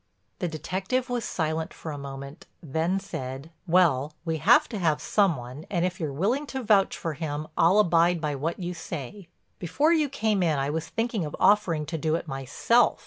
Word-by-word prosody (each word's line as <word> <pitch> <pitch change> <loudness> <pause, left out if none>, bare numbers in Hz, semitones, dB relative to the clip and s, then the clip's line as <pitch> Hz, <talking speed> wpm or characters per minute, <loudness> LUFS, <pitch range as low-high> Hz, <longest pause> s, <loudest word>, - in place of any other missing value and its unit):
The 180 - -1
detective 190 - -2
was 240 -2 -1
silent 160 -1 -2
for 160 - -6
a 145 - -5
moment, 140 +2 -8 0.2
then 160 +6 0
said: 135 -5 -6 0.2
"Well, 155 -5 +3
we 160 -1 -1
have 220 - +5
to 215 - -4
have 155 -4 +2
some 195 +2 +2
one 125 +4 -9
and 175 -2 +1
if 180 -1 -3
you're 155 -3 -2
willing 225 - 0
to 265 -2 -4
vouch 205 -3 +3
for 165 - -3
him 150 0 -4
I'll 175 +5 +4
abide 175 -3 +4
by 150 -2 -2
what 150 +5 -2
you 180 -1 -4
say. 170 +2 -7 0.3
Before 285 - +2
you 305 -3 +2
came 220 -6 0
in 160 -4 +2
I 135 +1 0
was 160 +1 -3
thinking 225 -4 -1
of 150 - -5
offering 190 -6 +3
to 160 +1 -4
do 155 +1 +1
it 170 - -4
myself. 135 - +2
165 Hz, 195 wpm, -26 LUFS, 150-200 Hz, 0.3 s, have